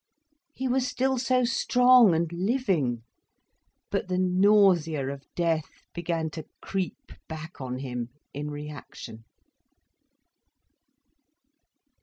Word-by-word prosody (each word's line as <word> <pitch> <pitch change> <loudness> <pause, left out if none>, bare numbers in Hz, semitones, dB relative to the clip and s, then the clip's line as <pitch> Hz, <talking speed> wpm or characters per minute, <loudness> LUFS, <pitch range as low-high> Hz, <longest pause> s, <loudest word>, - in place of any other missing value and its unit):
He 260 - -2
was 255 0 +1
still 265 0 0
so 255 0 +2
strong 245 -3 +5
and 165 +1 +1
living! 180 - 0 0.9
But - - -1
the 180 -1 -1
nausea 185 -6 +3
of 140 0 -13
death 165 -3 0 0.2
began 165 -2 -2
to 160 0 -8
creep 190 -2 -4 0.2
back 160 0 -8
on 125 -1 -4
him, 125 -3 -4 0.2
in 150 +1 -4
reaction. 145 -6 -9
170 Hz, 100 wpm, -27 LUFS, 150-220 Hz, 0.9 s, strong